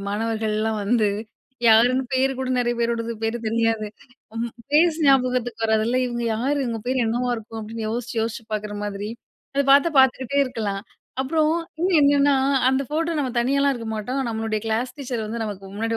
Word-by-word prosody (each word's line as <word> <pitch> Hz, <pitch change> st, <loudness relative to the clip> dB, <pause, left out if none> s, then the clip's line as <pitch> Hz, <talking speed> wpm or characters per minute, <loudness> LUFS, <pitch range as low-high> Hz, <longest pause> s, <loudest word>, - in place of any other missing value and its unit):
மாணவர்கள்லாம் 220 Hz, 0 st, -1 dB
வந்து, 215 Hz, -1 st, +2 dB, 0.6 s
யாருன்னு 245 Hz, +4 st, +5 dB
பேரு 265 Hz, +1 st, +2 dB
கூட 260 Hz, -, -2 dB
நெறைய 240 Hz, 0 st, 0 dB
பேரோடது 235 Hz, 0 st, -1 dB
பேரு 225 Hz, +1 st, 0 dB
தெரியாது. 225 Hz, -1 st, 0 dB, 0.5 s
ம் 235 Hz, -, -1 dB, 0.2 s
ஃபேஸ் 315 Hz, +2 st, +4 dB
ஞாபகத்துக்கு 250 Hz, -3 st, +2 dB
வராதுல்ல! 220 Hz, +3 st, +2 dB
"இவுங்க 240 Hz, -1 st, -3 dB
யாரு? 275 Hz, +6 st, 0 dB
இவுங்க 230 Hz, -2 st, -3 dB
பேர் 255 Hz, -2 st, +1 dB
என்னவா 245 Hz, +2 st, 0 dB
இருக்கும்!" 225 Hz, 0 st, -8 dB
அப்டின்னு 220 Hz, +1 st, -5 dB
யோசிச்சு. 240 Hz, +1 st, -4 dB
யோசிச்சு 230 Hz, 0 st, -4 dB
பாக்குற 210 Hz, 0 st, -4 dB
மாதிரி, 205 Hz, 0 st, -4 dB, 0.5 s
அத 280 Hz, -, +3 dB
பாத்தா 280 Hz, +4 st, +6 dB
பாத்துக்கிட்டே 265 Hz, +1 st, +2 dB
இருக்கலாம். 210 Hz, -5 st, -3 dB, 0.4 s
அப்புறம் 305 Hz, +3 st, +1 dB, 0.3 s
இன்னும் 360 Hz, 0 st, +3 dB
என்னான்னா, 285 Hz, 0 st, +4 dB, 0.3 s
அந்த 265 Hz, +1 st, +2 dB
ஃபோட்டோ 325 Hz, +3 st, -1 dB
நம்ம 270 Hz, -3 st, -1 dB
தனியாலாம் 275 Hz, +3 st, +2 dB
இருக்க 230 Hz, -2 st, -6 dB
மாட்டோம். 245 Hz, +6 st, -3 dB
நம்மளுடைய 220 Hz, -1 st, -2 dB
கிளாஸ் 235 Hz, +3 st, -1 dB
டீச்சர் 245 Hz, -5 st, -3 dB
வந்து 230 Hz, +2 st, -4 dB
நமக்கு 200 Hz, -2 st, -6 dB
முன்னாடி 225 Hz, +2 st, -1 dB
235 Hz, 160 wpm, -23 LUFS, 220-265 Hz, 0.6 s, பாத்தா